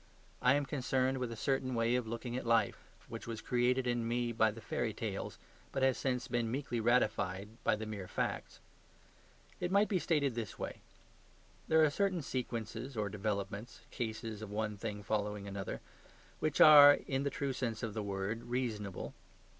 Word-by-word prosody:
I 125 +2 +5
am 145 0 +1
concerned 130 -1 0
with 125 -2 -2
a - - -5
certain 130 +1 0
way 115 +1 +2
of 125 -2 0
looking 115 +2 -4
at 130 - -2
life, 115 -3 +2 0.3
which - - -7
was 115 -2 -4
created 125 +2 +1
in 120 -2 0
me 120 0 0
by 110 -1 +3
the 110 +2 -7
fairy - - -2
tales, - - -4 0.3
but 135 - -1
has 130 -1 +4
since 125 -2 -1
been 120 -2 0
meekly 125 -1 -2
ratified 105 -4 +1
by - - +3
the 110 +1 -5
mere 105 -4 -6
facts. - - -3 1.0
It 175 - -1
might 200 +2 +4
be 190 - +2
stated 145 -6 +1
this 115 -3 -5
way. - - -5 0.9
There 160 0 +5
are 155 - +5
certain 185 -1 0
sequences 120 0 -4
or 105 -1 0
developments 100 +2 -4
(cases 110 -2 -4
of 110 - -6
one 105 0 -2
thing 105 0 -5
following 105 -1 -2
another), 100 -1 -5 0.6
which 155 -2 -1
are, 145 -2 +10
in 135 -1 -2
the 140 - 0
true 140 -1 -2
sense 120 -3 -3
of 110 -3 -2
the 110 - -2
word, 100 +3 -3
reasonable. 115 -6 -3
120 Hz, 180 wpm, -34 LUFS, 110-130 Hz, 1.0 s, are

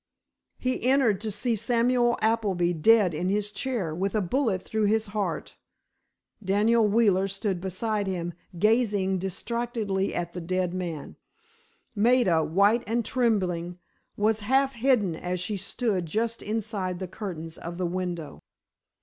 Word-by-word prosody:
He 255 0 -1
entered 250 -6 +3
to 220 -1 -3
see 230 +4 0
Samuel 240 +2 +2
Appleby 200 -6 +1
dead 190 +2 +4
in 175 +4 -1
his 205 +1 0
chair, 220 - -2
with 195 +6 -2
a - - +3
bullet 215 -2 0
through 220 -1 -1
his 220 +1 +2
heart. 210 -2 -3 0.9
Daniel 210 +4 +3
Wheeler 200 -3 +3
stood 195 -2 -2
beside 200 +2 -2
him, 175 -2 -3 0.2
gazing 205 -2 +2
distractedly 200 +1 -2
at 175 0 -3
the 180 - -5
dead 180 +1 -1
man. 170 -5 -5 0.8
Maida, 215 -7 +3
white 200 +9 +3
and 230 +1 0
trembling, 185 -8 0 0.4
was 215 +1 +2
half 265 +6 +2
hidden 235 -8 +2
as 180 +2 -3
she 180 +4 -2
stood 195 -2 -1
just 230 +7 -1
inside 210 -4 -3
the 185 0 -5
curtains 170 -5 -6
of 170 +1 -7
the 180 - -1
window. 175 -4 -4
205 Hz, 140 wpm, -27 LUFS, 180-230 Hz, 0.9 s, dead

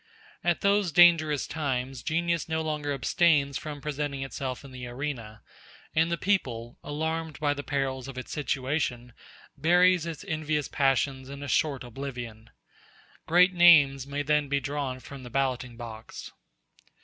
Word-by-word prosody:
At 175 -1 +1
those 200 -2 +2
dangerous 155 -3 +5
times 135 -4 -3
genius 170 +1 -1
no 160 0 0
longer 150 -2 -2
abstains 140 0 +2
from 150 -2 -7
presenting 145 -2 -3
itself 135 0 -5
in 135 - -11
the 125 -1 -7
arena; 120 -5 -6 0.5
and 165 +2 +2
the 170 - 0
people, 125 - -1
alarmed 160 +1 -3
by 145 -1 +1
the 145 - -5
perils 135 -2 -2
of 135 -2 -8
its 130 - -7
situation, 130 -4 -2 0.4
buries 175 +3 +4
its 165 +4 -6
envious 155 -3 -1
passions 135 -1 0
in 140 0 -7
a - - -5
short 140 +1 +1
oblivion. 120 -3 -7 0.8
Great 180 +3 +5
names 145 -6 +6
may 145 +1 -2
then 150 0 +1
be 140 0 +1
drawn 140 -2 -3
from 135 +1 -10
the 125 - -9
balloting 125 -2 -1
box. 115 -2 -9
140 Hz, 150 wpm, -28 LUFS, 130-160 Hz, 0.8 s, names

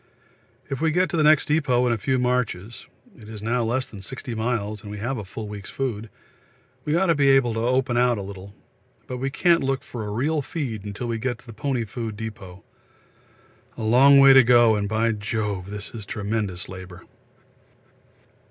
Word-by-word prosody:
If 135 +1 -4
we 160 - +3
get 180 +4 +1
to - - -2
the - - +3
next 155 0 +5
depôt 145 -5 +2
in 120 - +2
a - - -1
few 130 +5 0
marches 125 -4 -2 0.3
(it 110 - -14
is 105 -2 -8
now 120 +2 0
less 120 +3 0
than 110 -7 -11
60 125 +2 -7
miles 110 -2 -2
and 105 - -10
we 105 - -6
have 120 +4 -3
a - - -5
full 105 +3 -7
week's 105 -2 -8
food) 115 -5 -4 0.8
we 150 - +1
ought 180 +3 +3
to 170 - +4
be 140 -3 +3
able 135 -4 +4
to 115 - -2
open 125 +1 +1
out 120 -1 +3
a 100 - -4
little, 100 +1 -10 0.5
but 125 - -5
we 135 +2 -2
can't 170 +4 +3
look 135 0 -1
for 120 -3 -7
a 105 - -5
real 145 +9 0
feed 110 - -5
till 120 - -4
we 115 -1 -2
get 120 0 -2
to - - -21
the 115 - -10
pony 125 +1 -2
food 110 0 -6
depot. 105 -4 -8 1.1
A 115 - -5
long 130 +5 +6
way 135 0 +8
to 135 -1 +8
go, 120 -2 +5
and, 100 -1 -2
by 110 +2 +1
Jove, 105 -3 -3
this 105 0 -6
is 110 -4 -8
tremendous 100 -3 -3
labour. 95 -1 -10
115 Hz, 205 wpm, -24 LUFS, 105-130 Hz, 1.1 s, way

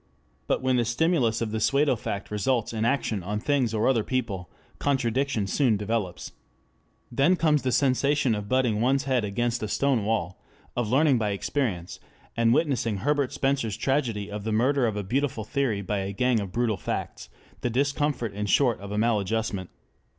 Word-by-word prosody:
But - - 0
when 130 -1 +2
the 120 - +3
stimulus 120 -2 +1
of 110 -2 -2
the 110 - -1
pseudo 140 +4 +3
fact 100 -2 -5
results 115 +3 0
in 110 0 -1
action 115 -5 0
on 105 +4 -3
things 135 -2 +1
or 110 0 +1
other 120 -5 +3
people, 105 -9 -3 0.3
contradiction 135 -4 0
soon 115 +2 +2
develops. 105 -3 -3 0.8
Then 140 +9 +3
comes 155 -4 +2
the 130 - -1
sensation 135 +1 +2
of 105 -1 -4
butting 125 -5 +2
one's 135 +3 +2
head 130 -4 +1
against 120 +4 -1
a 110 - -2
stone 135 0 +1
wall, 90 -5 -2 0.3
of 120 -3 -1
learning 135 0 +4
by 105 -2 0
experience, 100 -3 -2 0.4
and 115 0 +3
witnessing 125 -7 +1
Herbert 145 +4 0
Spencer's 135 -6 -1
tragedy 115 -7 -1
of 105 0 -5
the 110 - -2
murder 125 +4 +2
of 110 - -2
a 105 - -2
Beautiful 125 +2 -1
Theory 110 -3 -1
by 100 +2 -1
a 95 +1 -3
Gang 125 +3 +2
of 100 -3 -5
Brutal 115 -2 0
Facts, - - -5 0.3
the 125 - 0
discomfort 140 -2 0
in 105 +1 -3
short 125 +2 +3
of 100 +1 -8
a 105 - -2
maladjustment. 110 -3 0
115 Hz, 180 wpm, -26 LUFS, 105-135 Hz, 0.8 s, learning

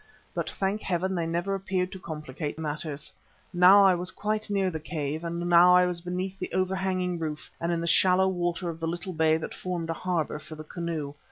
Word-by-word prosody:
But - - -2
thank 195 +2 -1
Heaven 185 +1 -1
they 170 -2 -1
never 175 +4 -1
appeared 190 -1 -1
to 190 - -8
complicate 150 -2 -5
matters. 150 -1 -4 0.4
Now 185 +3 +8
I 190 - +6
was 180 +1 -2
quite 215 +2 -2
near 195 -2 +1
the 160 - -4
cave, 155 0 -4
and 170 0 -3
now 175 +1 +6
I 180 0 +6
was 175 -1 -2
beneath 185 +2 -4
the - - -4
overhanging 185 -1 0
roof 155 -2 -5
and 170 +1 0
in 170 -1 0
the - - -2
shallow 185 +2 +4
water 175 -1 -1
of 165 -1 -4
the 165 - -2
little 175 +3 -4
bay 160 -1 +3
that 160 - -6
formed 175 -3 -3
a - - 0
harbour 165 -4 -2
for 155 - -10
the 155 - -8
canoe. 160 -3 -4
175 Hz, 210 wpm, -27 LUFS, 160-185 Hz, 0.4 s, Now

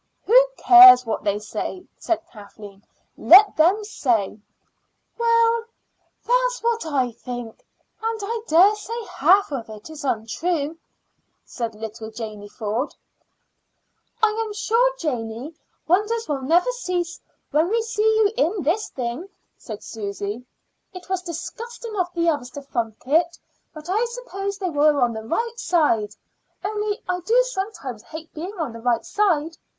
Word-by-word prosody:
"Who - - +6
cares 360 -9 +9
what 225 - -3
they 205 -1 0
say?" 215 - -5
said 335 - -1
Kathleen. 205 -1 -13 0.4
"Let 400 +4 +7
them 365 +7 +3
say." 230 - -1 0.8
"Well, 465 0 +3 0.6
that's - - +1
what 460 -6 0
I 265 -5 0
think; 240 -1 -8 0.4
and 450 0 -2
I 455 +2 -3
dare 365 +6 +6
say 425 +3 -6
half 370 +4 +3
of 235 -5 -5
it 215 +8 -10
is 310 -2 -9
untrue," 290 +6 -2 0.7
said 230 -3 -5
little 220 +1 -7
Janey 215 -2 -8
Ford. 220 +6 -3 1.3
"I 440 - +6
am 430 -2 -6
sure, 465 +4 +2
Janey, 250 - -4 0.3
wonders 420 +7 +1
will 285 -3 -2
never 340 - +3
cease 360 -8 -3 0.3
when 315 +4 +2
we 455 +2 +1
see 440 -2 -3
you 440 -1 +3
in 350 +5 +1
this 370 +9 0
thing," 250 +9 -5 0.3
said 215 -5 -9
Susy. 205 +1 -5 0.5
"It 365 0 -10
was 375 -1 -1
disgusting 450 +7 -7
of 355 -1 0
the 340 0 +1
others 290 -6 0
to 285 - -6
funk 230 -5 -4
it. 330 +5 +2 0.3
But 310 0 -11
I 410 +6 +1
suppose 400 -5 -5
they 370 -3 -3
were 295 -1 +3
on 240 -2 +2
the 220 - -5
right 465 - -2
side; 230 - +1 0.5
only 420 +1 -2
I 360 0 -1
do 445 +8 +2
sometimes 385 - -5
hate 315 +5 -10
being 365 +6 -7
on 305 -9 -3
the 230 - -9
right 235 -1 0
side. 330 -6 0
330 Hz, 145 wpm, -23 LUFS, -, 1.3 s, cares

